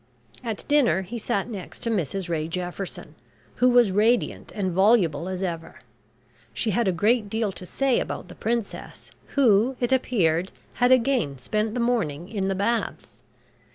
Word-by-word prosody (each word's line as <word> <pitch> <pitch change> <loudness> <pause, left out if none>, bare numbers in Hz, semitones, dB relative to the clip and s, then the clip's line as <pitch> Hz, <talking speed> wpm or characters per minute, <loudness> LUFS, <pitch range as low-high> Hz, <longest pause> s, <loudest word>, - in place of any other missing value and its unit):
At 225 -4 -5
dinner 275 -10 +3
he 230 +6 -6
sat 210 -2 -1
next 200 -6 -8
to 230 - 0
Mrs 190 -1 -1
Ray 160 -2 -1
Jefferson, 180 +2 -5 0.4
who 250 - +4
was 240 -4 +5
radiant 220 +5 +1
and 195 -3 -1
voluble 185 -4 +3
as 185 0 -3
ever. 165 -3 -5 0.7
She 220 - 0
had 225 +2 +1
a - - +4
great 210 +5 +2
deal 220 -1 -1
to 180 -1 -10
say 270 +3 +1
about - - -4
the 180 - -11
Princess, 230 -1 -4 0.2
who, 245 -2 +4
it 245 0 0
appeared, 190 -9 +1 0.3
had 245 +1 +5
again 245 - +2
spent 215 - -2
the - - -1
morning 180 -10 0
in 200 -3 -2
the 195 - 0
Baths. 225 +4 -2
205 Hz, 160 wpm, -25 LUFS, 180-235 Hz, 0.7 s, was